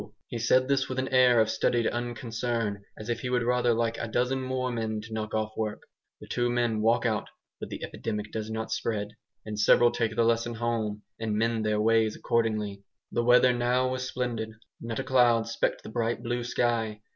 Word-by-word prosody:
He 120 - -5
said 130 +3 +3
this 135 -1 +1
with 130 - -4
an 130 0 -1
air 125 -2 +5
of 110 - +4
studied 115 +1 +1
unconcern, 115 -3 -2 0.2
as 110 - -8
if 120 -1 -1
he 125 - -4
would 125 -1 +1
rather 125 0 +2
like 115 0 0
a - - -3
dozen 125 +3 0
more 130 -1 -2
men 110 -2 -2
to 110 +1 -10
knock 110 0 -3
off 110 0 -1
work. 110 -1 -3 0.4
The - - -12
two 120 0 0
men 120 -3 +1
walk 115 +2 +3
out, 110 -3 0 0.3
but - - -6
the - - -6
epidemic 105 -2 -4
does 110 -1 -4
not 110 0 -4
spread, 105 -3 -1 0.4
and 105 -1 -5
several 120 +3 +5
take 115 -2 -1
the 115 - +3
lesson 115 0 +1
home 110 -2 -2 0.2
and 110 -2 -1
mend 115 -1 +1
their 105 0 +1
ways 110 0 +3
accordingly. 110 -4 -1 0.3
The - - +1
weather 125 +1 +6
now 125 +1 +1
was 130 0 -3
splendid; 120 -4 -3 0.3
not 115 -1 -4
a 135 - -1
cloud 120 -3 +3
specked 115 0 -1
the - - -8
bright 115 +1 -1
blue 120 0 -2
sky. 115 -3 0
115 Hz, 205 wpm, -28 LUFS, 110-120 Hz, 0.4 s, weather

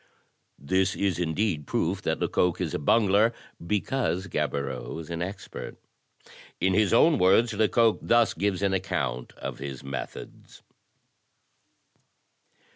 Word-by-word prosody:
This 95 +7 0
is 95 -3 0
indeed 80 -2 -1
proof - - -1
that - - -1
Lecoq 90 -2 +1
is - - -2
a - - -1
bungler 105 +6 +3 0.3
because 100 0 -1
Gaboriau 70 -6 -3
is 80 0 -8
an 85 0 -3
expert. 95 +2 -6 0.8
In 95 0 +2
his 105 0 +3
own 150 +6 +5
words 110 +6 +4
Lecoq 110 +2 +3
thus 120 -1 +3
gives 100 +2 -1
an 100 -1 +2
account 65 -10 -2
of - - -7
his 70 -1 -6
methods. 70 0 -8
95 Hz, 120 wpm, -27 LUFS, 80-105 Hz, 0.8 s, own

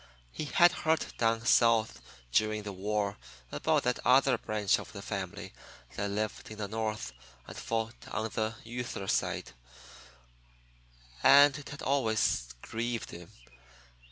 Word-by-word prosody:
He 155 - -5
had 175 +4 +5
heard 160 -2 0
down 115 0 +1
South 115 -2 +3 0.3
during 110 - +1
the 105 - -5
war 100 - -2 0.3
about - - +1
that - - 0
other - - +5
branch 105 -2 0
of - - -9
the - - -7
family - - -5 0.4
that 100 - -2
lived 105 +1 -3
in 110 - -9
the 105 -1 -3
North 110 - -3 0.3
and - - -10
fought 115 0 -4
on 110 0 -3
"the 110 0 -1
yuther 120 -4 -5
side," - - -1 1.7
and 145 0 +7
it 145 -1 -8
had 140 - -8
always 110 - +1 0.2
grieved 115 +1 -3
him. 85 0 -10
110 Hz, 135 wpm, -30 LUFS, 105-120 Hz, 1.7 s, and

